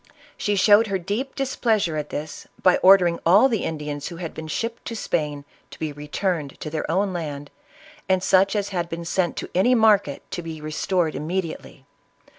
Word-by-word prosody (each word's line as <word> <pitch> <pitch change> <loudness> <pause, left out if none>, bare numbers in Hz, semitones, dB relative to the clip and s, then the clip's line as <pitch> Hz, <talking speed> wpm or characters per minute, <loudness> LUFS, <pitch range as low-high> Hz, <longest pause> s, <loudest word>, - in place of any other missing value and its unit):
She 205 - -1
showed 205 +3 +5
her 195 -1 0
deep 205 +9 -4
dis 270 -1 -2
pleasure 210 -9 +1
at 150 -1 -3
this, 150 +1 -6 0.2
by 185 -1 +5
ordering 180 -3 +5
all 195 +10 +6
the 225 -6 -1
Indians 150 -2 -4
who 170 - -7
had 165 -1 -6
been 160 0 -7
shipped 230 +8 -4
to 230 - -5
Spain 150 -8 -2 0.2
to - - -12
be 155 -1 -3
returned 150 +1 -3
to 155 - -5
their 155 -1 -3
own 190 +3 +1
land, 145 -4 -5 0.6
and 185 -1 +2
such 195 +2 +3
as 205 -1 -1
had 175 -3 -3
been 170 0 -5
sent 175 0 -1
to - - -5
any 220 +8 +4
market, 215 - +3
to 175 - -3
be 165 -2 -7
restored 155 +2 -1
immediately. 160 -4 -5
175 Hz, 190 wpm, -23 LUFS, 155-200 Hz, 0.6 s, all